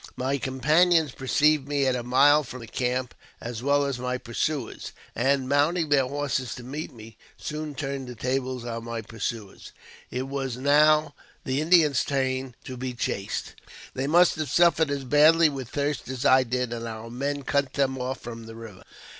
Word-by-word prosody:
My 135 +2 -1
companions 155 +4 +3
perceived 145 +2 +2
me 140 -1 0
at 130 -1 +2
a 125 - -2
mile 140 +5 +4
from 125 -1 -9
the - - -8
camp, 125 +2 -2 0.3
as 115 -1 -6
well 140 +2 +2
as 135 -3 -3
my 125 0 -2
pursuers; 125 +2 -3 0.2
and, 135 +2 +1
mounting 150 +4 +2
their 135 -3 +3
horses 135 -3 -2
to 125 - -9
meet 145 +6 -6
me, 110 -1 -13 0.2
soon 150 -1 -5
turned 135 -2 -4
the 125 - -8
tables 130 0 -2
on 115 -1 -5
my 115 -1 -5
pursuers. 110 -2 -6 0.4
It 125 - -3
was 135 -3 -3
now 150 +2 +4 0.3
the 135 +2 0
Indians' 155 -5 +4
turn 130 -2 -2
to 130 - -7
be 125 0 -4
chased. 100 -4 -3 0.4
They 135 +1 -2
must 175 +3 +4
have 155 -3 -3
suffered 170 0 +4
as 140 -1 -2
badly 155 +4 +5
with 135 -4 -6
thirst 145 -1 -2
as 130 -1 -4
I 130 0 +6
did, 125 0 -2
and 115 0 -5
our 110 +1 -7
men 140 +3 -3
cut 140 -1 0
them 135 -2 0
off 125 +1 -3
from 115 -1 -8
the 115 - -10
river. 115 -5 -11
130 Hz, 180 wpm, -26 LUFS, 125-145 Hz, 0.4 s, I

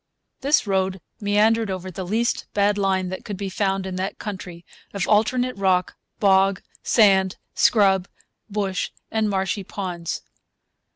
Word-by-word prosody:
This 285 0 +2
road 190 -1 0 0.2
meandered 215 +2 +2
over 185 0 -4
the 185 +2 -5
least 230 +5 0
bad 205 0 +3
line 190 -2 0
that 185 - -6
could 205 -4 -5
be 195 0 -3
found 195 0 -1
in 185 -1 -4
that 190 +1 -3
country 180 -4 -7 0.3
of 200 - -1
alternate 245 +4 +2
rock, 185 -2 +1 0.2
bog, 195 -1 +3 0.2
sand, 190 -4 +4 0.2
scrub, 195 -4 +4 0.4
bush, 200 -2 -1 0.2
and 220 -1 +1
marshy 195 +1 -1
ponds. 180 -4 -5
195 Hz, 135 wpm, -23 LUFS, 190-210 Hz, 0.4 s, sand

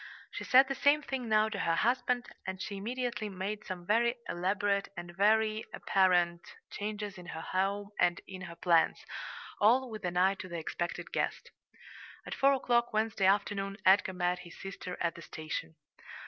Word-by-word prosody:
She - - -5
said 265 +1 +6
the 275 - -1
same 290 +2 +3
thing 260 -4 -4
now 215 0 +4
to 210 -2 -4
her 165 -3 +1
husband, 245 +3 +1 0.2
and 190 0 -4
she 200 +1 -5
immediately 230 0 -3
made 200 +2 -4
some 180 -2 -6
very 235 +4 +3
elaborate 200 +2 0
and 175 0 -7
very 215 +2 +3
apparent 175 -3 +2 0.3
changes 210 -1 -4
in 175 - -11
her 160 - -6
home 200 +3 -1
and 175 -1 +3
in 190 -1 -8
her 170 - -9
plans, 170 -1 +2 0.5
all 245 +4 +4
with 215 -1 -7
an 180 -1 -2
eye 190 +2 +4
to - - -6
the 170 - -4
expected 170 +1 -4
guest. - - -2 0.7
At - - -5
four 275 +1 +4
o'clock 240 -2 +1
Wednesday 215 -3 +1
afternoon 195 0 +1
Edgar 190 0 +5
met 180 0 0
his 170 -2 -12
sister 195 -2 -6
at 170 -1 0
the 170 - -11
station. 155 - -6
200 Hz, 175 wpm, -31 LUFS, 180-220 Hz, 0.7 s, said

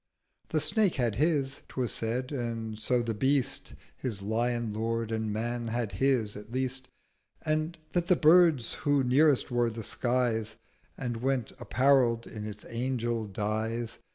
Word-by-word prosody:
The - - +1
Snake 215 -5 +2
had 120 -5 +1
his, 140 0 0
'twas 125 -3 -2
said; 125 +4 -2
and 115 -4 -3
so 120 +2 +1
the 115 -1 -2
Beast 135 +3 0 0.2
His 110 -7 -3
Lion 115 +1 0
lord: 115 +1 -2
and 110 -1 -1
Man 120 +2 -2
had 115 -2 -2
his, 115 0 +1
at 105 +2 -10
least: 130 +1 -1 0.6
And 155 +2 0
that 175 -1 0
the 180 - +5
Birds, 160 -6 +5
who 145 -2 +1
nearest 135 +2 +3
were 120 -1 +2
the 115 0 -6
Skies, 115 -2 0 0.4
And 120 -3 -3
went 130 -1 -1
apparell'd 125 -2 +3
in 105 -1 -6
its 105 0 -8
Angel 120 -2 -2
Dyes. 110 +3 -2
120 Hz, 150 wpm, -29 LUFS, 110-135 Hz, 0.6 s, the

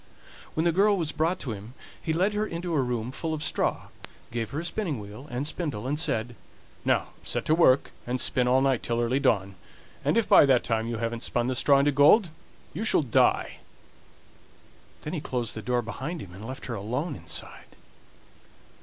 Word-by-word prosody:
When 160 - +1
the 170 - +3
girl 200 +4 +3
was 160 -4 -1
brought 165 +4 0
to 125 - -4
him 105 +4 -8 0.3
he 160 - -2
led 185 +6 +1
her 210 +1 0
into 170 -1 -4
a 145 - +3
room 125 -1 -2
full 160 +4 -3
of 150 - -5
straw, - - -1 0.4
gave 115 -1 -3
her 145 +3 -3
a - - -6
spinning 170 - -2
wheel 105 +7 -10
and 125 +3 -3
spindle, 150 -7 -4
and 145 +3 -1
said: 120 -6 -1 0.5
"Now - - +1
set - - -1
to 155 - +3
work 140 -5 +4 0.2
and 125 +1 -1
spin 125 0 +2
all 130 +1 +4
night 135 -3 +2
till 120 0 -1
early 120 +3 +1
dawn, 100 -8 +1 0.5
and - - +2
if 230 - +2
by - - +7
that 130 -3 +4
time 115 -1 -1
you 115 -1 -3
haven't 115 0 -3
spun 120 -1 0
the 130 +1 -1
straw 140 +2 +4
into 140 +1 +3
gold 155 - +5 0.4
you 195 - -3
shall 215 - +3
die." 120 - +2 1.4
Then 150 - -5
he 160 - -2
closed 120 -5 -2
the 110 - -6
door 125 +1 0
behind 135 +10 -5
him 90 - -10
and 100 +5 -9
left 130 +1 -7
her 120 - -4
alone 125 - -3
inside. 80 -4 -7
130 Hz, 200 wpm, -27 LUFS, 115-160 Hz, 1.4 s, by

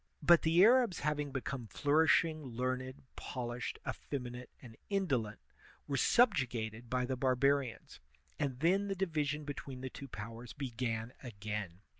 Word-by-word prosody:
But 170 +2 +7
the 165 +3 +5
Arabs 235 -4 +5
having 150 -1 -1
become 130 -2 -4
flourishing, 155 - +3
learned, 130 +1 -3
polished, 120 -1 -4
effeminate, 125 -2 -5
and 120 -3 -12
indolent, 135 - 0 0.5
were 140 - -2
subju 190 - +4
gated 115 0 -5
by 125 0 +1
the 130 +1 -1
barbarians, 130 0 +1 0.4
and 135 -3 -2
then 195 +5 +3
the 195 - -1
division 155 -5 -1
between 140 -2 -6
the 130 -1 -5
two 140 - -8
powers 115 +1 -8
began 120 -3 -3
again. 105 -6 -5
130 Hz, 135 wpm, -34 LUFS, 120-150 Hz, 0.5 s, But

